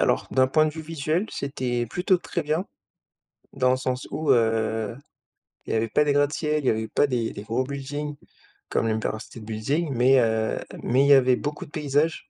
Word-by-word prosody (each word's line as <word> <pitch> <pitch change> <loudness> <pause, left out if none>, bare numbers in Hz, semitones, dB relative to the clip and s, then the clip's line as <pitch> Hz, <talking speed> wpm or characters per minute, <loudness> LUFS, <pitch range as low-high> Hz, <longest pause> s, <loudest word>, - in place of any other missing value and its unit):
alors - - +2
d'un 130 0 +4
point 155 +2 +4
de 150 - -2
vue 160 - -7
visuel, 160 +4 -1
c'était 125 -4 -2
plutôt 180 - +1
très 170 - -3
bien, 155 +5 -1 0.9
dans 130 -2 +2
le 130 - +2
sens 130 0 -3
où, 155 - 0
heu, 110 -1 +1 0.7
il - - -3
y - - +1
avait 110 +1 0
pas 150 - +3
des 145 - +2
gratte-ciel, 150 +1 +1
il 130 - -1
y - - +6
avait 110 0 0
pas - - +2
des 120 -4 -1
des 100 - -7
gros 115 +4 -1
buildings 145 +2 -5 0.5
comme 115 - 0
l'Empire 110 0 -1
State 115 - -11
Building 135 +9 -2
mais 130 +2 +5
heu, 110 -1 +1 0.3
mais 130 +3 +3
il - - +3
y 145 - +8
avait 130 -2 +5
beaucoup 145 +3 -4
de - - -18
paysages. 150 +1 0
135 Hz, 205 wpm, -25 LUFS, 115-150 Hz, 0.9 s, y